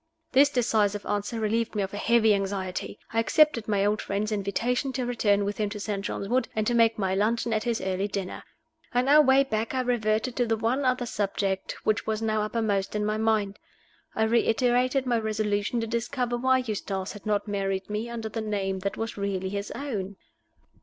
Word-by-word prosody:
This 280 +2 +6
decisive 215 -6 +1
answer 205 +3 -2
relieved 225 +1 0
me 205 - +1
of 195 - -5
a - - -4
heavy 225 0 +4
anxiety. 195 -1 -3 0.2
I 225 - +2
accepted 240 -1 +3
my 200 -2 +2
old 210 +1 +1
friend's 205 +2 -2
invitation 230 +6 -1
to 255 -2 -2
return 205 -4 +2
with 205 +1 -3
him 210 -1 0
to 210 0 -6
St. 200 -1 -3
John's 200 - -3
Wood, 255 +4 +1
and 215 -1 0
to 240 - +1
make 230 -1 +4
my 190 -2 0
luncheon 225 +4 +1
at 215 0 -1
his 235 -2 0
early 190 +1 -1
dinner. 200 -2 -4 0.5
On 250 +2 +2
our 300 +2 +8
way 270 -1 +5
back 225 -1 -2
I 260 - +2
reverted 240 0 0
to 245 -2 +2
the 225 0 +1
one 245 +5 0
other 255 -1 +1
subject 195 -3 -2
which 215 0 0
was 215 -1 0
now 215 -1 0
uppermost 210 -2 -1
in 210 0 0
my 215 0 0
mind. 215 -2 0 0.6
I 220 - +2
reiterated 245 +3 +2
my 240 -2 +1
resolution 215 +1 -1
to - - -1
discover 240 +2 -2
why 260 +1 +2
Eustace 195 -3 -3
had 205 +1 -10
not 210 0 0
married 195 -2 -2
me 210 +3 -3
under 230 -2 -4
the 220 +1 -4
name 195 -3 -2
that 200 +1 -3
was 225 -1 -4
really 195 -2 -2
his 200 +1 -4
own. 205 -9 -4
215 Hz, 200 wpm, -27 LUFS, 200-235 Hz, 0.6 s, our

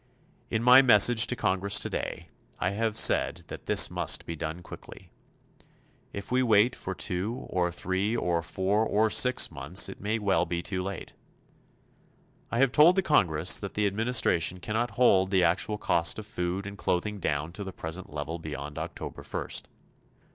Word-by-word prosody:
In 115 0 -2
my 125 +2 +8
message 120 -2 +5
to 120 - -1
Congress 95 -2 0
today, - - -3 0.3
I 90 - -1
have 110 +1 -2
said - - +3
that - - -10
this - - +5
must - - 0
be 85 - -6
done 80 +2 -6
quickly. - - -13 1.0
If 100 +3 -8
we 130 +1 +2
wait 115 0 +3
for 95 - -6
two 100 +10 -4
or 90 -1 0
three 95 +6 -2
or 85 -5 -1
four 95 +5 -1
or 110 0 +1
six 125 -7 +3
months 75 +5 +1
it - - -11
may 105 +3 -1
well 95 -5 0
be 85 0 -3
too 95 0 -3
late. 95 0 -7 1.4
I - - -3
have 135 0 +3
told 160 +7 +5
the 190 - +1
Congress 90 - +3
that 100 - -8
the 105 - 0
administration 100 -5 +1
cannot 110 +6 -2
hold 95 -6 +3
the 95 -2 +2
actual 95 +5 0
cost 85 -5 +1
of 110 - -7
food 90 +1 -4
and 100 -1 -9
clothing 100 +4 -2
down 75 -1 -2
to 100 +4 -7
the 95 - -7
present 85 +1 -7
level 75 +3 -5
beyond 75 -2 -7
October - - -7
first. - - -4
95 Hz, 170 wpm, -27 LUFS, 85-110 Hz, 1.4 s, my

